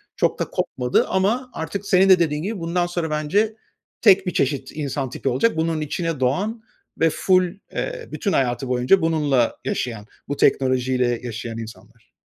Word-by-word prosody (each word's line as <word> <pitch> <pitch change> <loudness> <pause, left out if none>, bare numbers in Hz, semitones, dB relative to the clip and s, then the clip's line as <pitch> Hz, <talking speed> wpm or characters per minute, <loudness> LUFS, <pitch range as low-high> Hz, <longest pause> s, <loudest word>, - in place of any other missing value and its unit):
çok - - 0
da - - 0
kopmadı 125 0 0
ama 220 +7 0
artık 200 +5 -5
senin 190 0 +4
de, 185 -2 +7
dediğin 150 -2 0
gibi, 205 -1 -3
bundan 170 +1 0
sonra 175 -2 -3
bence 155 +9 +1 0.5
tek 195 -4 +5
bir 180 - -1
çeşit 140 0 -1
insan 140 -3 -3
tipi 135 - -3
olacak. 145 - +1
Bunun 160 -1 0
içine 165 0 -2
doğan 200 - 0 0.4
ve 165 - +4
ful, 185 +3 +3 0.3
eee, - - -4
bütün 200 - -2
hayatı 125 0 0
boyunca 125 +10 +3
bununla 150 -7 +1
yaşayan, 115 -4 -3 0.2
bu 145 - -3
teknolojiyle 130 -2 +2
yaşayan 115 -1 -5
insanlar. 115 0 -11
155 Hz, 160 wpm, -22 LUFS, 125-185 Hz, 0.5 s, de